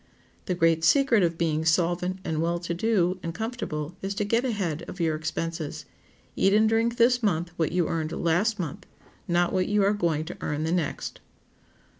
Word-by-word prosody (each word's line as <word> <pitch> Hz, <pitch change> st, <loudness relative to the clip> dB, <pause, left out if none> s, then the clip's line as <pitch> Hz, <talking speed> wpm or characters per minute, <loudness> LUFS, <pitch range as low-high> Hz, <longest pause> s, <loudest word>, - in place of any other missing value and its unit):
The 180 Hz, -, -1 dB
great 165 Hz, -2 st, +2 dB
secret 255 Hz, -, +4 dB
of 170 Hz, -2 st, +1 dB
being 160 Hz, -2 st, 0 dB
solvent 175 Hz, +3 st, +1 dB
and 160 Hz, -3 st, -1 dB
well 170 Hz, +1 st, 0 dB
to 170 Hz, 0 st, -4 dB
do 185 Hz, -1 st, +1 dB
and 165 Hz, -1 st, -5 dB
comfortable 180 Hz, -9 st, -4 dB
is 195 Hz, +1 st, -3 dB
to 205 Hz, 0 st, -1 dB
get 230 Hz, +4 st, +1 dB
ahead 190 Hz, -, -2 dB
of 190 Hz, -, -8 dB
your 165 Hz, -2 st, +1 dB
expenses. 160 Hz, 0 st, -4 dB, 0.5 s
Eat 195 Hz, +1 st, +3 dB
and 215 Hz, +1 st, +5 dB
drink 225 Hz, +2 st, +1 dB
this 245 Hz, +1 st, +4 dB
month 175 Hz, -5 st, 0 dB
what 160 Hz, -2 st, 0 dB
you 175 Hz, -1 st, +1 dB
earned 160 Hz, -1 st, -2 dB
last 180 Hz, +8 st, +1 dB
month, 180 Hz, +2 st, -5 dB, 0.4 s
not 175 Hz, 0 st, +2 dB
what 185 Hz, -1 st, +1 dB
you 205 Hz, 0 st, +2 dB
are 200 Hz, +1 st, +3 dB
going 165 Hz, -6 st, 0 dB
to 175 Hz, -, -7 dB
earn 150 Hz, +1 st, -2 dB
the 160 Hz, -, -1 dB
next. 170 Hz, -5 st, -2 dB
175 Hz, 190 wpm, -26 LUFS, 165-205 Hz, 0.5 s, and